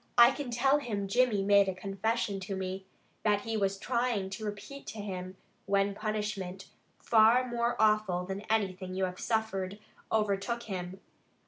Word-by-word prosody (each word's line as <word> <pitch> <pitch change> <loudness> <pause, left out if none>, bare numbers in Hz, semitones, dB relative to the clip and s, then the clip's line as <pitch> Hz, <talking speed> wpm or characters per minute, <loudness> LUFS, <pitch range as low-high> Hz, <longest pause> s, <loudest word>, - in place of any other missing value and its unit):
I 240 +1 +9
can 285 -3 -5
tell 270 +4 +3
him 210 -7 -3
Jimmy 230 -2 +2
made 200 -1 +5
a 190 - -3
confession 200 +2 -1
to 195 +1 -4
me, 190 0 -4 0.3
that 205 -1 +2
he 225 +1 -3
was 195 -2 0
trying 235 -4 -1
to 215 +3 -5
repeat 210 +7 -7
to - - -6
him, 185 -2 -5 0.3
when 200 0 +2
punishment, 210 -3 -4 0.3
far 230 +3 +5
more 235 0 0
awful 215 -5 +2
than 190 +1 -4
anything 190 -4 -1
you 190 0 +1
have 180 0 -6
suffered, 205 -4 -1 0.3
overtook 215 +2 0
him. 185 -2 -5
205 Hz, 155 wpm, -31 LUFS, 190-225 Hz, 0.3 s, I